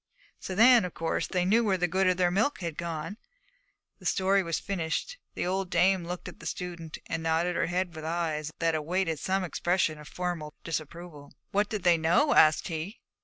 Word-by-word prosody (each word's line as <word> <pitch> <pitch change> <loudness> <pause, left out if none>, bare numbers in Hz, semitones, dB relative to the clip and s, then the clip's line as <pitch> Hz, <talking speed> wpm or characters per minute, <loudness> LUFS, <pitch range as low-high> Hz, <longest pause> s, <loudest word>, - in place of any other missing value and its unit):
So 185 - -5
then, 235 +2 +7
of 180 - -5
course 165 0 -1
they 180 -1 0
knew 225 +5 +4
where 195 -4 +2
the 180 0 +1
good 190 +2 +1
of 185 -1 +2
their 180 -1 +2
milk 215 +6 +1
had 170 -3 -4
gone.' 170 +4 -4 0.8
The - - -4
story 195 +1 +3
was 165 -3 -2
finished. 195 - -3 0.2
The - - -2
old 190 +1 -1
dame 185 -1 +3
looked 180 +1 -6
at 180 - -10
the 165 - -7
student 170 -3 -5
and 165 - -3
nodded 165 +2 +1
her - - +1
head 175 -1 -2
with 155 - -7
eyes 160 -2 -2
that 165 -1 +1
awaited 165 +1 -1
some 190 +4 0
expression 175 -2 0
of 150 - -11
formal 175 -4 -4
disapproval. 160 -2 -6 0.2
'What 205 +1 +1
did 210 -4 -3
they 175 -2 +5
know?' 175 - +3
asked 155 -1 +5
he. 165 +6 -5
175 Hz, 200 wpm, -28 LUFS, 160-190 Hz, 0.8 s, then